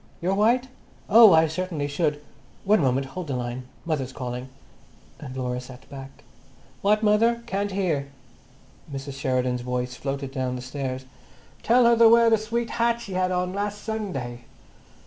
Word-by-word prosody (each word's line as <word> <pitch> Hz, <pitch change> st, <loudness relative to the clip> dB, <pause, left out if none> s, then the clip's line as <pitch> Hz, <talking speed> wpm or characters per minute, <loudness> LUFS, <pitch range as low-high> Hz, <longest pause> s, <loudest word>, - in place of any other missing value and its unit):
Your 180 Hz, +3 st, 0 dB
white? 235 Hz, +6 st, +2 dB, 0.4 s
Oh, 225 Hz, -1 st, +9 dB
I 160 Hz, -1 st, +6 dB
certainly 160 Hz, -2 st, -3 dB
should. 145 Hz, 0 st, -1 dB, 0.4 s
One 210 Hz, -1 st, +4 dB
moment—hold 135 Hz, +6 st, -1 dB
the 135 Hz, -, -2 dB
line. 125 Hz, +1 st, -4 dB, 0.2 s
Mother's 145 Hz, -6 st, -2 dB
calling." 125 Hz, 0 st, -6 dB, 0.7 s
And 130 Hz, -3 st, -8 dB
Laura 125 Hz, -1 st, -2 dB
sat 125 Hz, 0 st, -13 dB
back. 135 Hz, -1 st, -10 dB, 0.6 s
"What, 210 Hz, +2 st, +2 dB
mother? 230 Hz, +3 st, +3 dB
Can't 200 Hz, +1 st, -2 dB
hear." 170 Hz, -8 st, -1 dB, 0.8 s
Mrs. 140 Hz, 0 st, -6 dB
Sheridan's 125 Hz, -2 st, 0 dB
voice 125 Hz, 0 st, -3 dB
floated 135 Hz, +1 st, -4 dB
down 130 Hz, -2 st, -2 dB
the 125 Hz, -, -6 dB
stairs. 130 Hz, -1 st, -5 dB, 0.6 s
"Tell 245 Hz, +1 st, +4 dB
her 235 Hz, 0 st, +6 dB
to 230 Hz, 0 st, +7 dB
wear 230 Hz, 0 st, +6 dB
that 225 Hz, -, +4 dB
sweet 230 Hz, +2 st, -3 dB
hat 235 Hz, 0 st, +1 dB
she 205 Hz, -5 st, -8 dB
had 185 Hz, 0 st, +1 dB
on 180 Hz, 0 st, -1 dB
last 205 Hz, +1 st, -3 dB
Sunday." 135 Hz, -, -4 dB
155 Hz, 155 wpm, -25 LUFS, 130-210 Hz, 0.8 s, Oh